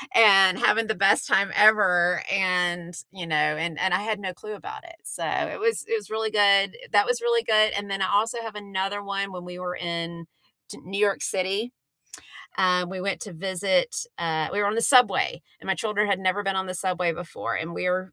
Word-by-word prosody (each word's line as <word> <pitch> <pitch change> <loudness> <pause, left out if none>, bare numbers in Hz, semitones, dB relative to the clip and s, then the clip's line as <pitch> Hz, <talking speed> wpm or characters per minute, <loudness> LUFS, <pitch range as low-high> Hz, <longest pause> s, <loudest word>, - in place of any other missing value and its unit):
and 195 -4 +7
having 225 0 +2
the 220 - -1
best 195 +1 +3
time 195 0 +2
ever," 185 -5 +4
and, 180 -2 0 0.2
you 185 -3 -8
know, 155 - -1
and 150 +2 0
and 190 +1 +1
I - - +2
had 215 0 -2
no 190 -2 -5
clue 215 +4 -9
about 425 - -10
it, 340 -1 -13
so - - -5
it - - -2
was 455 +2 0
it 460 - 0
was 430 - -9
really 220 0 -2
good. 200 - +3 0.2
That - - +5
was 485 0 -1
really 470 -1 +1
good, 215 0 +3
and 200 0 -5
then 195 0 -2
I 190 - 0
also 225 +4 +1
have 225 -2 -8
another 200 0 -4
one 200 0 -3
when 180 -1 -8
we 180 0 -9
were 180 0 -4
in 170 -1 -5 0.4
t - - -9
New 195 +2 -4
York 205 -2 +1
City. 195 +6 -2 0.9
Um, 180 -1 +2
we 190 -1 -6
went 195 +1 -3
to 205 - -8
visit, 195 - -1 0.2
uh, 160 -2 -1
we 205 - -2
were 205 - +1
on 205 - 0
the 230 - 0
subway, 250 0 +3 0.2
and - - -12
my - - +2
children 210 -1 0
had 195 -2 +1
never 190 +2 0
been 195 -1 -2
on 190 - -1
the 185 - -5
subway 180 -2 -1
before, 170 +1 -6
and 165 +1 -4
we're 180 0 -2
195 Hz, 220 wpm, -24 LUFS, 180-215 Hz, 0.9 s, and